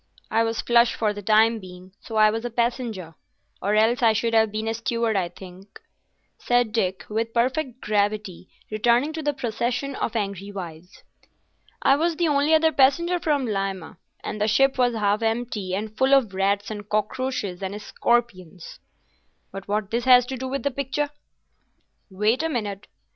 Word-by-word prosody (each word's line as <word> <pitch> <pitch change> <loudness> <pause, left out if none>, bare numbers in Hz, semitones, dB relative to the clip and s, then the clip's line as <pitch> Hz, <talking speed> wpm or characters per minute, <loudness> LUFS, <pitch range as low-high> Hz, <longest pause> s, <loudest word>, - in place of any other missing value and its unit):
"I 225 +1 +3
was 225 0 -1
flush 235 0 +3
for 215 -2 0
the 205 - -7
time 220 +2 +3
being, 185 -1 -12
so 225 - -8
I 215 0 +5
was 225 +1 -3
a 240 - -3
passenger, 235 -7 -2 0.5
or 205 +2 +1
else 225 +3 +3
I 225 -2 +5
should 230 +1 -1
have 220 -1 +3
been 215 +1 -3
a 225 - 0
steward, 230 -1 -1
I 180 -3 0
think," 185 +2 -13 0.6
said 245 -2 +1
Dick, 190 -4 -1
with 225 +2 -3
perfect 255 +1 0
gravity, 205 -3 -1 0.2
returning 240 +7 +2
to 320 - -4
the 295 -1 0
procession 245 +2 -2
of 230 - -3
angry 200 -2 -3
wives. 180 -2 -9 0.8
"I 275 - +5
was 330 +2 0
the 340 +1 +1
only 290 0 +2
other 320 0 +3
passenger 340 +6 +3
from 295 -5 0
Lima, 195 -6 -4 0.2
and 210 - -5
the 210 - +2
ship 270 +5 +3
was 245 -2 +2
half 210 0 +1
empty, 225 -4 -2
and 215 +2 -5
full 265 +4 +4
of 235 -8 +1
rats 200 +2 0
and 205 -1 -7
cockroaches 215 -2 -2
and 195 +2 -4
scorpions." 200 -7 -2 0.7
"But 195 0 -8
what 205 0 -2
has 235 - +1
this 250 -1 +6
to 265 - -3
do 260 +1 -5
with 275 +1 -3
the 280 - 0
picture?" 280 +2 -2 1.0
"Wait 210 +7 +1
a 325 - -1
minute. 210 -7 -4
225 Hz, 175 wpm, -24 LUFS, 200-250 Hz, 1.0 s, this